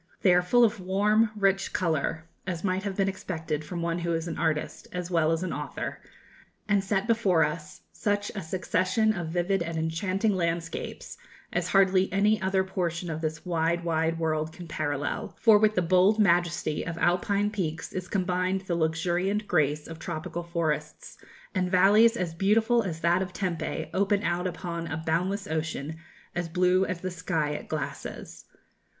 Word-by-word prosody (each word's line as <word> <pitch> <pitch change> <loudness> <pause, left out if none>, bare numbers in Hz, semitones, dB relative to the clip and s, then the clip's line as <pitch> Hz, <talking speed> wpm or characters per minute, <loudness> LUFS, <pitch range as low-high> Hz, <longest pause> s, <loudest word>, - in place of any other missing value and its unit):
They 185 - +6
are 180 - +5
full 240 +7 +4
of 220 -2 +2
warm, 210 +4 +2
rich 195 -2 +1
colour, 160 -1 -1 0.2
as 175 -3 -3
might 185 -1 0
have 200 -1 -4
been 195 -1 +2
expected 160 -5 -3
from 170 +2 -5
one 170 0 -1
who 170 0 -1
is 165 +1 -2
an 165 - -3
artist 160 -2 -1
as 180 0 -4
well 165 -2 +3
as 165 +2 0
an 185 - -2
author, - - -5 0.7
and 205 -2 +2
set 195 0 0
before 210 -8 +3
us 150 +1 -4
such 205 0 -1
a 200 - -4
succession 185 +5 +1
of 175 -5 -4
vivid 175 +3 0
and 170 -1 -3
enchanting 185 +6 0
landscapes 170 -2 -3 0.3
as 175 0 0
hardly 190 0 +3
any 205 +2 +3
other 190 0 +2
portion 175 -2 -2
of 160 0 -4
this 155 -1 -3
wide, 170 0 0
wide 165 0 0
world 155 -1 -1
can 175 +1 -10
parallel; 145 -2 -3
for 220 -3 +6
with 215 0 +3
the 180 - +2
bold 185 +5 +4
majesty 175 -5 +2
of 165 0 -5
Alpine 200 +4 +1
peaks 165 -7 -3
is 185 -1 -4
combined 185 0 0
the 190 -2 -3
luxuriant 175 +5 0
grace 150 -2 +1
of 165 0 -8
tropical 170 +1 -4
forests, 160 -3 -3 0.4
and 185 -3 0
valleys 210 +6 +5
as 175 -3 -2
beautiful 220 +6 +3
as 165 -6 -4
that 175 +2 +3
of 185 -1 -4
Tempe 175 -5 -3
open 200 +1 +2
out 175 +1 0
upon 170 -2 -4
a 160 - -3
boundless 180 +5 -1
ocean 160 -1 -3 0.4
as 175 -1 -3
blue 180 +2 +3
as 185 -3 -4
the 185 - -3
sky 165 -3 -1
it - - -5
glasses. - - -6
180 Hz, 175 wpm, -27 LUFS, 165-195 Hz, 0.7 s, They